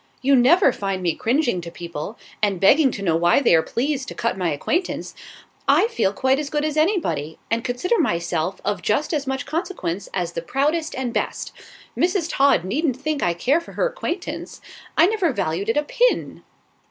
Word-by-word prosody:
"You 275 +1 +5
never 270 +4 +5
find 195 -2 -3
me 170 -2 +1
cringing 240 - 0
to 170 - -7
people, 170 +4 -7 0.2
and 200 -4 +1
begging 270 - +5
to 200 - -5
know 165 -4 +2
why 175 +6 +4
they 275 - +3
are 165 - +6
pleased 265 - -2
to - - -7
cut 230 - -1
my 180 -3 -1
acquaintance. 335 - -2 0.5
I - - +5
feel 445 - +1
quite 265 +6 +1
as 295 -2 -3
good 295 0 -1
as 305 -1 -2
anybody, 305 - 0
and 230 0 +1
consider 260 - 0
myself 175 - -1
of 205 -3 -1
just 275 - 0
as 290 -3 -1
much 265 +1 -2
consequence 310 - -3
as 175 -2 -2
the 165 - -4
proudest 300 - -1
and 255 -3 -3
best. - - -2 0.4
Mrs. 350 -2 0
Todd 275 -9 +3
needn't 265 - 0
think 295 +1 -2
I 170 -1 +1
care 270 - +2
for 335 - -13
her - - 0
acquaintance; 390 -8 -5 0.4
I 325 - +7
never 390 -5 +1
valued 195 -2 -2
it 225 - +1
a 295 - +2
pin." - - 0
260 Hz, 190 wpm, -22 LUFS, 185-310 Hz, 0.5 s, I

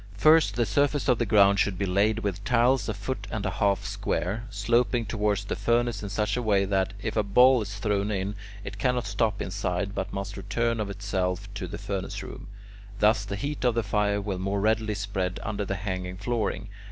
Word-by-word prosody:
First 155 -4 +5
the 120 0 +2
surface 140 +7 +1
of 125 -3 +3
the 120 - 0
ground 100 -1 +5
should 100 -2 +1
be 100 - 0
laid 100 +4 +2
with 100 -1 -3
tiles 125 +2 +2
a - - 0
foot 100 0 -4
and 105 -2 -3
a 95 - 0
half 100 0 +1
square, 100 +8 -2
sloping 115 +2 +1
towards 105 -1 0
the - - -2
furnace 120 +2 +1
in 100 - -5
such 105 0 0
a 125 - -1
way 100 -4 +2
that, 95 0 0
if 110 - -2
a 110 - +3
ball 125 +5 +5
is 105 0 -5
thrown 105 -1 0
in, 100 -1 -2 0.3
it 100 - -7
cannot 125 0 +1
stop 100 +1 0
inside 90 +1 -2
but 95 -1 -3
must 100 +1 -5
return 115 +4 -1
of 105 -2 -2
itself 95 -1 -2
to 100 -3 -5
the - - -6
furnace 100 -2 -4
room; - - -9 0.5
thus 105 +1 +3
the 100 0 -4
heat 140 +8 -4
of 120 -2 +3
the 115 - +1
fire 100 0 +1
will 100 -2 -3
more 100 +2 -1
readily 110 +1 +1
spread 95 -2 -2
under 105 -1 -2
the 100 - -2
hanging 90 -1 -4
flooring. 105 -1 -2
100 Hz, 210 wpm, -27 LUFS, 100-110 Hz, 0.5 s, First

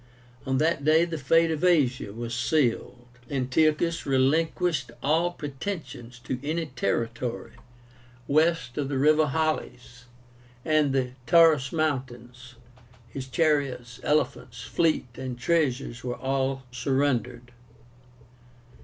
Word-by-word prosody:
On 135 0 +1
that 155 0 +1
day 160 +3 +4
the 165 -2 -5
fate 165 +4 +3
of 160 +1 -3
Asia 135 - +2
was 115 +2 -6
sealed. 125 -1 0 0.2
Antiochus 155 +5 +1
relinquished 145 +1 +1
all 160 +5 +2
pretensions 140 -6 -7
to 130 - -4
any 160 +3 -2
territory 115 -2 -3 0.8
west 155 -3 +1
of 140 -2 -2
the 140 - -1
river 155 +3 +4
Halys 135 -5 -3 0.6
and 155 -2 +2
the 130 -2 0 0.2
Taurus 160 -5 +5
mountains. 130 -5 -4 0.5
His 130 +3 -7
chariots, 135 -5 0
elephants, 125 -6 -1
fleet, 160 +7 +1
and 130 -2 -5
treasures 130 -4 -1
were 125 -1 -3
all 135 0 -1
surrendered. 125 -2 -1
135 Hz, 110 wpm, -26 LUFS, 125-155 Hz, 0.8 s, Taurus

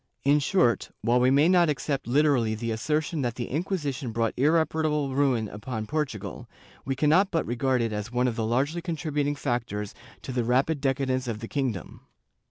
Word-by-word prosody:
In 145 +2 +4
short, 140 -6 +2
while 120 +2 +3
we 125 +1 +4
may 140 +4 +5
not 175 -2 +4
accept 140 -2 -2
literally 125 -4 +2
the 115 +1 -3
assertion 150 +7 -1
that 120 -3 -2
the 120 - -4
Inquisition 145 - -2
brought 115 0 -1
irre 160 +5 +3
parable 150 -3 -1
ruin 130 -5 +2
upon 110 +2 -5
Portugal, 140 -5 -4 0.3
we 135 +1 -2
cannot 155 +8 +3
but 165 - 0
regard 125 +1 0
it 115 -2 -2
as 105 +2 -4
one 125 +1 +1
of 120 - -1
the 115 - -2
largely 135 +9 0
contributing 150 -4 -2
factors 120 -7 -3 0.3
to - - -5
the 125 -1 0
rapid 135 +5 +1
decadence 135 -2 0
of 115 -3 -2
the 115 +1 -7
kingdom. 125 - -3
135 Hz, 180 wpm, -26 LUFS, 120-150 Hz, 0.3 s, may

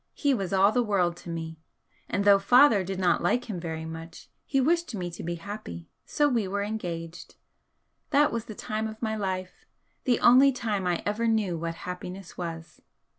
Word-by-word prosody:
He 285 -2 +2
was 195 -7 -2
all 195 +1 +5
the 245 - +2
world 190 -6 +1
to 175 - -10
me, 160 -1 -5 0.5
and 200 - -1
though 200 -1 +7
father 235 0 +5
did 190 +1 -4
not 185 -2 +2
like 245 +8 +1
him 200 -6 -4
very 160 -1 -5
much 165 +1 -9 0.2
he 270 - +1
wished 335 -1 +1
me 175 -3 -4
to 170 - -8
be 170 +1 -3
happy, 170 - -8 0.2
so 295 - +2
we 235 -7 0
were 200 +1 -2
engaged. 175 -6 -5 0.7
That 295 +1 +4
was 230 -1 -3
the 215 - -8
time 215 +1 -3
of 220 0 -8
my 220 -2 -2
life 185 -3 -4 0.4
the 245 -3 +2
only 260 +3 +7
time 215 -7 -2
I 175 -1 0
ever 215 +3 0
knew 215 -6 +1
what 165 0 -4
happiness 180 +1 -7
was. 165 -2 -7
195 Hz, 190 wpm, -27 LUFS, 175-225 Hz, 0.7 s, though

